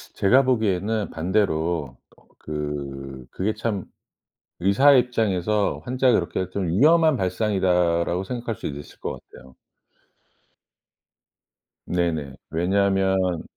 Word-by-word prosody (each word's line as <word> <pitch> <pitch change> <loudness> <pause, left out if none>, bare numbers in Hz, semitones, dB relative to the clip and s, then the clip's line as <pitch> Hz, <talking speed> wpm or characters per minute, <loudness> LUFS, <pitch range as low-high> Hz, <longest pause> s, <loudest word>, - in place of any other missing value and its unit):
제가 125 +8 +4
보기에는 110 -3 0
반대로 85 -5 -1 0.2
거 - - -26 0.2
그 70 -3 -6
그게 100 +4 -1
참 105 -4 -3 0.8
의사의 130 +9 +5
입장에서 105 -4 0
환자를 125 -2 +2
그렇게 95 -1 -3
좀 95 -2 -2
'위험한 155 - +4
발상이다.'라고 90 -4 +1
생각할 120 +2 -4
수도 70 -7 -6
있을 75 - -13
것 - - -5
같아요. 65 0 -16 2.3
네네. 80 -6 -1 0.2
왜냐하면 95 0 +1
95 Hz, 240 characters per minute, -23 LUFS, 85-110 Hz, 2.3 s, 의사의